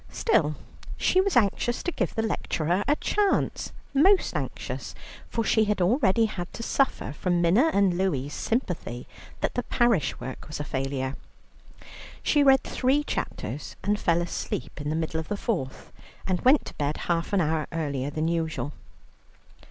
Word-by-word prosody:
Still 155 Hz, -, +2 dB, 0.4 s
she 370 Hz, -, +3 dB
was 380 Hz, -8 st, +1 dB
anxious 240 Hz, +2 st, +1 dB
to 355 Hz, -, -1 dB
give -, -, -2 dB
the 220 Hz, -, 0 dB
lecturer 180 Hz, -3 st, 0 dB
a 290 Hz, -, +4 dB
chance, 410 Hz, +5 st, 0 dB, 0.2 s
most 370 Hz, +8 st, +4 dB
anxious, -, -, -4 dB, 0.3 s
for 230 Hz, -, -1 dB
she 220 Hz, 0 st, +3 dB
had 210 Hz, -1 st, 0 dB
already 220 Hz, +2 st, +3 dB
had 180 Hz, -5 st, -5 dB
to 230 Hz, -, -6 dB
suffer 265 Hz, -, 0 dB
from 175 Hz, +3 st, 0 dB
Minna 190 Hz, -, +4 dB
and 195 Hz, -3 st, +3 dB
Louie's 145 Hz, -7 st, 0 dB
sympathy 180 Hz, -, -2 dB, 0.3 s
that -, -, 0 dB
the 245 Hz, -, 0 dB
parish 235 Hz, -, +1 dB
work 130 Hz, -, -7 dB
was 150 Hz, -, -6 dB
a -, -, -1 dB
failure. 135 Hz, -1 st, -2 dB, 1.1 s
She 295 Hz, -, +3 dB
read 270 Hz, -2 st, +6 dB
three 270 Hz, +3 st, +1 dB
chapters 140 Hz, -, -4 dB
and 205 Hz, +1 st, +1 dB
fell 170 Hz, -2 st, +2 dB
asleep 155 Hz, -4 st, -4 dB
in 145 Hz, -, -3 dB
the 155 Hz, -, 0 dB
middle 160 Hz, 0 st, -1 dB
of 160 Hz, -, -5 dB
the 205 Hz, -, -2 dB
fourth, 170 Hz, -, -3 dB, 0.3 s
and 185 Hz, -2 st, 0 dB
went 270 Hz, +3 st, +5 dB
to -, -, -8 dB
bed 145 Hz, +1 st, -1 dB
half 170 Hz, -1 st, 0 dB
an 200 Hz, -, +3 dB
hour 160 Hz, -2 st, 0 dB
earlier 145 Hz, -4 st, -2 dB
than 155 Hz, +2 st, -1 dB
usual. 160 Hz, -3 st, -2 dB
180 Hz, 165 wpm, -26 LUFS, 155-240 Hz, 1.1 s, read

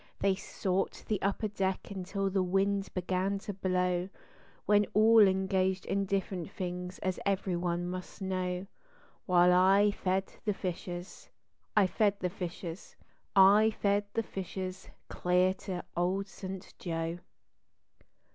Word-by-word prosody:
They 195 Hz, -1 st, +3 dB
sought 190 Hz, 0 st, -2 dB
the 210 Hz, -3 st, -1 dB
upper 200 Hz, +2 st, 0 dB
deck 195 Hz, -1 st, -2 dB
until 195 Hz, +1 st, -2 dB
the 190 Hz, 0 st, +2 dB
wind 195 Hz, +2 st, +1 dB
began 185 Hz, +2 st, 0 dB
to 205 Hz, +1 st, -6 dB
blow, 180 Hz, -1 st, 0 dB, 0.6 s
When 205 Hz, -1 st, +4 dB
all 225 Hz, +2 st, +7 dB
engaged 190 Hz, 0 st, +1 dB
in 200 Hz, 0 st, 0 dB
different 190 Hz, -3 st, -2 dB
things 180 Hz, 0 st, -5 dB
as 185 Hz, -1 st, -1 dB
every 195 Hz, -2 st, 0 dB
one 175 Hz, 0 st, -1 dB
must 185 Hz, 0 st, -6 dB
know; 185 Hz, -1 st, -2 dB, 0.6 s
While 180 Hz, -1 st, +5 dB
I 195 Hz, +3 st, +5 dB
fed 190 Hz, -1 st, -1 dB
the 210 Hz, -2 st, 0 dB
fishes, 175 Hz, 0 st, -6 dB, 0.5 s
I 205 Hz, -, +7 dB
fed 200 Hz, +2 st, +1 dB
the 180 Hz, -1 st, -1 dB
fishes, 175 Hz, -1 st, -6 dB, 0.4 s
I 200 Hz, +3 st, +7 dB
fed 200 Hz, 0 st, +2 dB
the 225 Hz, -, +1 dB
fishes 190 Hz, -1 st, -6 dB, 0.2 s
clear 180 Hz, +1 st, +2 dB
to 180 Hz, -2 st, -4 dB
Old 185 Hz, +3 st, 0 dB
St. 190 Hz, -1 st, -8 dB
Joe. 165 Hz, 0 st, -3 dB
190 Hz, 130 wpm, -31 LUFS, 180-195 Hz, 0.6 s, all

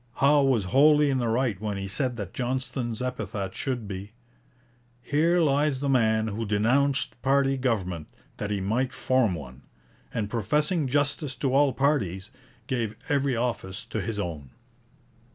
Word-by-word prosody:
Howe 145 Hz, +2 st, +4 dB
was 130 Hz, -7 st, +2 dB
wholly 150 Hz, +1 st, +6 dB
in 130 Hz, -, +1 dB
the 120 Hz, -, 0 dB
right 115 Hz, -4 st, 0 dB
when 105 Hz, -2 st, -2 dB
he 100 Hz, 0 st, -4 dB
said 125 Hz, +4 st, -2 dB
that 100 Hz, -4 st, -6 dB
Johnston's 125 Hz, -2 st, -2 dB
epitaph 115 Hz, -6 st, -4 dB
should 125 Hz, -6 st, -3 dB
be, 100 Hz, +2 st, -7 dB, 0.9 s
'Here 160 Hz, +7 st, +2 dB
lies 145 Hz, -3 st, +2 dB
the 140 Hz, 0 st, -1 dB
man 110 Hz, -4 st, +2 dB
who 110 Hz, +2 st, -3 dB
denounced 120 Hz, +6 st, +1 dB
party 135 Hz, 0 st, +3 dB
government, 95 Hz, -, -1 dB, 0.3 s
that 105 Hz, -, -3 dB
he 100 Hz, -2 st, -1 dB
might 120 Hz, +7 st, 0 dB
form 130 Hz, -7 st, +1 dB
one; 65 Hz, -4 st, -9 dB, 0.5 s
and 110 Hz, -3 st, -2 dB
professing 150 Hz, -, 0 dB
justice 145 Hz, +1 st, 0 dB
to 130 Hz, +1 st, -1 dB
all 140 Hz, 0 st, +4 dB
parties, 105 Hz, -, 0 dB, 0.3 s
gave 115 Hz, -4 st, -2 dB
every 140 Hz, -2 st, +1 dB
office 115 Hz, -5 st, -3 dB
to -, -, -3 dB
his 115 Hz, -2 st, -4 dB
own.' 80 Hz, -9 st, -4 dB
125 Hz, 150 wpm, -26 LUFS, 105-140 Hz, 0.9 s, wholly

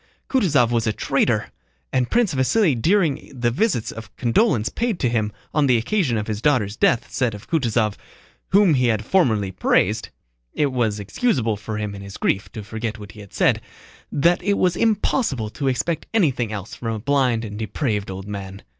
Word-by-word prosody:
Kutúzov 150 Hz, -, +3 dB
was 115 Hz, -1 st, +1 dB
a 110 Hz, -, +1 dB
traitor, -, -, 0 dB, 0.4 s
and 125 Hz, -2 st, +1 dB
Prince 235 Hz, -7 st, +2 dB
Vasíli 150 Hz, -, +3 dB
during 155 Hz, -, +1 dB
the 120 Hz, 0 st, +2 dB
visits 125 Hz, -, 0 dB
of 115 Hz, 0 st, -9 dB
condolence 120 Hz, -, +2 dB
paid 235 Hz, -5 st, -1 dB
to 125 Hz, -, +1 dB
him 110 Hz, -3 st, 0 dB, 0.2 s
on 150 Hz, -2 st, +3 dB
the 125 Hz, -2 st, +4 dB
occasion 130 Hz, -, 0 dB
of 105 Hz, -, -2 dB
his 105 Hz, -1 st, -4 dB
daughter's 120 Hz, -8 st, +2 dB
death 115 Hz, -, +2 dB
said 125 Hz, -5 st, 0 dB
of 105 Hz, -, -12 dB
Kutúzov, 115 Hz, -9 st, 0 dB, 0.5 s
whom 195 Hz, -3 st, +5 dB
he 125 Hz, -3 st, +2 dB
had 110 Hz, -2 st, 0 dB
formerly 110 Hz, -, +2 dB
praised 95 Hz, -, +1 dB, 0.5 s
(it 145 Hz, -2 st, +1 dB
was 115 Hz, -5 st, 0 dB
excusable 115 Hz, -, 0 dB
for 105 Hz, +1 st, -6 dB
him 105 Hz, -1 st, -3 dB
in 100 Hz, -, -8 dB
his 100 Hz, 0 st, -9 dB
grief 100 Hz, -, -1 dB
to 110 Hz, -, -6 dB
forget 110 Hz, +2 st, -4 dB
what 105 Hz, -2 st, -10 dB
he 105 Hz, -, -14 dB
had 100 Hz, -2 st, -12 dB
said), -, -, +2 dB, 0.5 s
that 170 Hz, +5 st, +2 dB
it 200 Hz, +2 st, +1 dB
was 180 Hz, -2 st, +2 dB
impossible 210 Hz, -, 0 dB
to 140 Hz, +3 st, -3 dB
expect 160 Hz, +5 st, -1 dB
anything 130 Hz, -, +2 dB
else 100 Hz, -1 st, -6 dB
from 115 Hz, -2 st, -3 dB
a -, -, -5 dB
blind 125 Hz, -2 st, +1 dB
and 105 Hz, 0 st, -7 dB
depraved 110 Hz, -1 st, -2 dB
old 95 Hz, +1 st, -7 dB
man. 100 Hz, -1 st, -7 dB
120 Hz, 190 wpm, -22 LUFS, 105-150 Hz, 0.5 s, whom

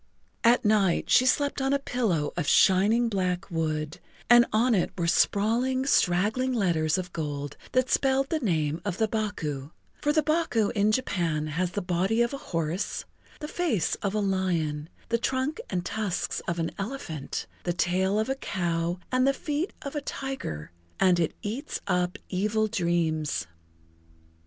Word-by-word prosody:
At 235 Hz, 0 st, +4 dB
night 205 Hz, -4 st, +2 dB
she 255 Hz, -, +6 dB
slept 285 Hz, +1 st, +1 dB
on 270 Hz, +1 st, +1 dB
a -, -, +4 dB
pillow 220 Hz, -, -1 dB
of 175 Hz, -4 st, -2 dB
shining 205 Hz, +5 st, +4 dB
black 185 Hz, -3 st, -1 dB
wood, 155 Hz, -2 st, -2 dB, 0.3 s
and 240 Hz, 0 st, +8 dB
on 235 Hz, +3 st, +3 dB
it 190 Hz, -, +2 dB
were 170 Hz, -, 0 dB
sprawling, 235 Hz, +9 st, +2 dB
straggling 220 Hz, +4 st, +2 dB
letters 170 Hz, -7 st, +1 dB
of 180 Hz, -1 st, -5 dB
gold 145 Hz, -3 st, -4 dB, 0.2 s
that 255 Hz, 0 st, +3 dB
spelled 270 Hz, 0 st, +2 dB
the 320 Hz, -, +1 dB
name 160 Hz, -, 0 dB
of 195 Hz, -3 st, -3 dB
the 220 Hz, -, +2 dB
Baku, 165 Hz, -11 st, -3 dB, 0.3 s
for 295 Hz, -, +2 dB
the 310 Hz, 0 st, +2 dB
Baku 305 Hz, -9 st, +1 dB
in 210 Hz, +1 st, +2 dB
Japan 175 Hz, -10 st, 0 dB
has 175 Hz, +4 st, -2 dB
the 205 Hz, -, -2 dB
body 190 Hz, +6 st, +1 dB
of 235 Hz, -, -2 dB
a 275 Hz, -, -4 dB
horse, 165 Hz, +2 st, -2 dB, 0.4 s
the 300 Hz, -, -4 dB
face 310 Hz, -, 0 dB
of 200 Hz, 0 st, -1 dB
a -, -, +2 dB
lion, 170 Hz, -6 st, -1 dB, 0.2 s
the 235 Hz, -, +1 dB
trunk 265 Hz, -, -1 dB
and 175 Hz, -1 st, -2 dB
tusks 210 Hz, -5 st, -2 dB
of 170 Hz, -, -1 dB
an 165 Hz, -1 st, -1 dB
elephant, 195 Hz, -, -4 dB, 0.2 s
the 175 Hz, -, -1 dB
tail 185 Hz, +3 st, +1 dB
of 220 Hz, -, +1 dB
a 265 Hz, -, +1 dB
cow 175 Hz, -8 st, -2 dB
and 255 Hz, +1 st, +3 dB
the 275 Hz, -, +4 dB
feet 300 Hz, +6 st, -2 dB
of 280 Hz, 0 st, -6 dB
a 295 Hz, -, -1 dB
tiger, 265 Hz, -, -5 dB, 0.3 s
and 180 Hz, -2 st, +4 dB
it[Pg 165 Hz, -, +3 dB
31] -, -, -38 dB
eats 240 Hz, +9 st, -4 dB
up 180 Hz, +2 st, 0 dB
evil 210 Hz, +3 st, 0 dB
dreams. 170 Hz, -6 st, 0 dB
200 Hz, 165 wpm, -27 LUFS, 170-250 Hz, 0.4 s, and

